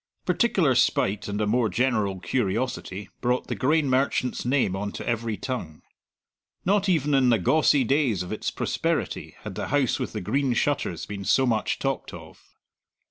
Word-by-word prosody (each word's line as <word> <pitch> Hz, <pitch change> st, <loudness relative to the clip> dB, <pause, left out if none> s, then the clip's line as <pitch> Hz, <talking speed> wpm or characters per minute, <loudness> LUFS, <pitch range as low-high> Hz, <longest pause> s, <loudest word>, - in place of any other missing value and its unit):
Particular 195 Hz, -, +2 dB
spite 105 Hz, -4 st, +1 dB
and 100 Hz, 0 st, -3 dB
a -, -, +2 dB
more 115 Hz, +1 st, +2 dB
general 110 Hz, -7 st, 0 dB
curiosity 105 Hz, -2 st, -2 dB
brought 125 Hz, +1 st, 0 dB
the -, -, -3 dB
grain 150 Hz, +3 st, +2 dB
merchant's 130 Hz, -1 st, 0 dB
name 125 Hz, -7 st, +1 dB
on 100 Hz, +1 st, -3 dB
to -, -, -7 dB
every 115 Hz, -2 st, -1 dB
tongue. 95 Hz, -, -5 dB, 0.8 s
Not 200 Hz, +1 st, +2 dB
even 150 Hz, -5 st, +2 dB
in 130 Hz, -2 st, +4 dB
the 115 Hz, -, +4 dB
gawcey 145 Hz, -, +3 dB
days 125 Hz, -, +1 dB
of 90 Hz, -, -8 dB
its 110 Hz, -, -2 dB
prosperity -, -, -2 dB
had -, -, -7 dB
the -, -, -4 dB
House 145 Hz, -3 st, +1 dB
with -, -, -4 dB
the 110 Hz, -, -3 dB
Green 135 Hz, +7 st, 0 dB
Shutters 120 Hz, -, -1 dB
been 100 Hz, -1 st, -6 dB
so 130 Hz, +7 st, +3 dB
much 115 Hz, -3 st, 0 dB
talked -, -, -3 dB
of. -, -, -13 dB
125 Hz, 170 wpm, -25 LUFS, 105-140 Hz, 0.8 s, in